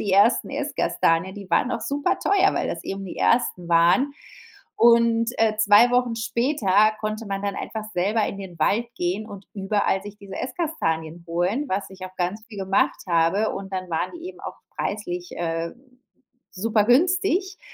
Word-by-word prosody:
die 200 - -1
ersten 205 +5 +4
Esskastanien. 190 - 0
Die 200 -2 -10
waren 250 - +2
auch - - -2
super 290 +9 0
teuer, 395 -1 +3
weil - - -1
das - - -4
eben 195 0 -5
die 180 - -8
ersten 185 -7 +1
waren, 175 +12 +4 0.7
und, 235 0 +5
äh, 220 -1 +2
2 215 +3 +6
Wochen 245 -2 +1
später 220 -3 +2
konnte 215 +1 -3
man 195 0 -3
dann 200 -1 -2
einfach 220 +1 -5
selber 205 +5 +1
in 200 - -5
den 180 -4 -9
Wald 220 +9 +2
gehen 185 +5 -2
und 200 -2 -10
überall 195 -1 0
sich 205 0 -9
diese 200 -2 -10
Esskastanien 170 - -3
holen, 185 - 0
was 195 0 -2
ich 190 - -14
auch 185 - -16
ganz 185 +5 -2
viel 210 - -11
gemacht 190 0 +1
habe, 170 +5 +2
und 195 0 -6
dann 185 -1 -4
waren 160 - -1
die 340 +1 -9
eben 375 - -9
auch - - -7 0.2
preislich, 180 -4 -4
äh, 165 -1 -2 0.8
super 215 +2 +1
günstig. 365 - +2
205 Hz, 175 wpm, -24 LUFS, 185-235 Hz, 0.8 s, 2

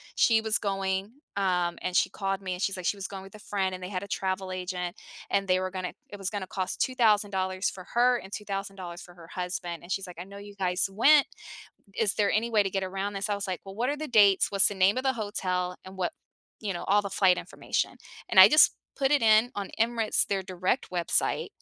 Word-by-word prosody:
she 225 -1 +4
was 220 -2 +1
going, 195 0 -2 0.2
um, 180 -3 0
and 185 - -3
she - - +3
called 195 0 -3
me, 185 -1 -3
and 180 - -6
she's 195 -1 0
like, 180 - -6
she - - +1
was 195 -1 -6
going 195 -1 -7
with 195 +2 -13
a - - -11
friend, 190 -3 -2
and 185 - -9
they 180 - -5
had 185 -2 -3
a - - -8
travel 190 -1 -2
agent, 180 -1 -4 0.3
and 195 0 +1
they 185 0 +4
were 185 0 -2
gonna 185 -1 -4 0.2
it 205 - -8
was 195 -1 -3
gonna 200 -3 -4
cost 185 -1 -4
$2,000 205 -6 +1
for 185 -1 -10
her 245 +1 +4
and 190 - -12
$2,000 195 -4 -5
for 175 - -13
her 170 -2 -14
husband. 180 -1 -4
And 175 - -10
she's 195 0 -2
like, 180 - -10
"I - - -4
know 200 +2 -12
you 205 0 -11
guys 185 -1 0
went, 275 +9 +5 0.7
is 210 -3 +1
there 205 -2 +2
any 225 +2 +1
way 215 -2 +4
to 195 - -3
get 195 0 -1
around 195 +2 -3
this?" 200 +1 -3
I 205 - +1
was 200 0 -3
like, 185 -2 -3
"Well, 195 0 -9
what 240 +6 0
are 290 - -2
the 305 +1 -5
dates? 205 -5 +5
What's 195 -1 +5
the 205 - -5
name 190 +2 +3
of 255 - -1
the 265 - +3
hotel? 185 -5 -2
And 190 0 -11
what" 180 -2 -1 0.5
you 210 -3 -2
know, 175 - -5
all 205 +1 +3
the 200 - -5
flight 190 -1 +4
information. - - -3 0.3
And - - +7
I - - +11
just 305 - +6 0.2
put 270 -2 +1
it 290 - +4
in 220 +2 +5
on 200 -1 -4
Emirates, 230 -1 +2
their 195 -1 -1
direct 185 0 -2
website, 175 -2 0
195 Hz, 245 wpm, -28 LUFS, 185-205 Hz, 0.7 s, I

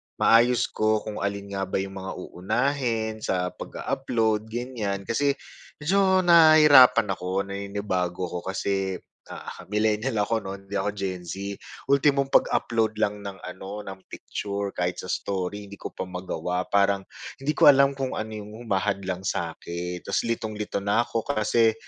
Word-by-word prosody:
maayos 120 +2 +4
ko 110 0 +1
kung 105 - -5
alin 100 0 -3
nga 95 -1 -2
ba - - -4
yung 95 0 -2
mga 95 0 -6
uunahin 110 +3 -1
sa 90 -3 -1
pag-a-upload, 115 -5 -2
ganyan. 110 -4 -3
Kasi 140 +6 +1 0.4
medyo 190 +4 +3
nahirapan 150 - +7
ako, 95 +1 -2
naninibago 100 -3 -2
ako, 90 - -3
kasi, 95 0 -1 0.3
ah, - - -9
millenial 110 +2 +1
ako 115 +2 +1
'no, 95 -3 -5
hindi 100 +1 -6
ako 95 +1 0
Gen 95 -3 -4
Z. 100 +3 -5 0.3
Ultimong 140 0 +3
pag-upload 115 -4 +2
lang 105 -1 -1
ng 100 -1 -7
ano 95 +3 -7
ng 95 -1 -10
picture, 100 0 -4
kahit 90 -2 -2
sa 95 - -9
story 100 +2 -3
hindi 100 0 -12
ko - - -4
pa - - -6
magawa, 90 0 -3
parang 100 -1 +3 0.4
hindi 150 +2 -1
ko - - +5
alam 140 -1 +6
kung 135 -1 -2
ano 110 - -4
'yong 105 0 -9
humahadlang 95 -3 -2
sa'kin, 85 +1 -4
'tas 100 - 0
litong-lito 110 -2 -3
na 100 +3 +2
ako 115 -1 -3
kasi 115 -3 +2
105 Hz, 150 wpm, -25 LUFS, 95-115 Hz, 0.4 s, nahirapan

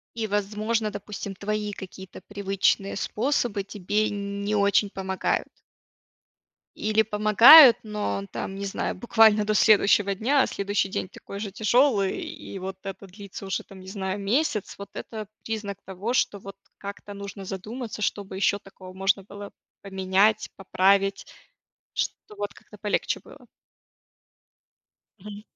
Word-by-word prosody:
И, 225 -1 -2
возможно, 210 +2 -1
допустим, 200 -1 -6
твои 210 +1 -3
какие-то 190 -1 -10
привычные 195 -1 0
способы 225 -2 -1
тебе 205 +2 -1
не 200 +1 -3
очень 200 0 +3
помогают. 190 -1 -2 1.3
Или 215 +1 +2
помогают, 225 +6 +9
но 100 - -3
там, 190 - -4
не 200 +1 -4
знаю, 195 - -3
буквально 220 -3 +4
до 215 - +1
следующего 205 -1 +4
дня. 260 +8 +2
А - - +2
следующий 200 0 -1
день 190 - -3
такой 200 +1 -10
же 205 -1 -4
тяжелый, 220 -1 +2
и 195 - -8
вот 190 0 -6
это 195 0 -7
длится 200 +1 -10
уже, 195 - -2
там, 195 - -14
не 185 - -13
знаю, 190 0 -4
месяц. 215 +1 0
Вот 200 0 -9
это 215 -3 -7 0.2
признак 210 -3 -4
того, 195 +5 -4
что 205 - +1
вот 195 0 -11 0.2
как-то 200 0 -8
нужно 200 -1 -8
задуматься, 215 +4 -6
что 205 0 -1
бы 190 - -9
еще 200 +1 +1
такого 185 -2 -13
можно 195 +1 0
было 205 +1 -10 0.3
поменять, 190 +2 +1
поправить, 195 +1 +2 0.7
чтоб 210 - -4
вот 205 0 -4
как-то 210 - -16
полегче 205 0 -1
было. - - -16 1.7
Мгм. 205 +1 -9
200 Hz, 140 wpm, -25 LUFS, 195-215 Hz, 1.7 s, помогают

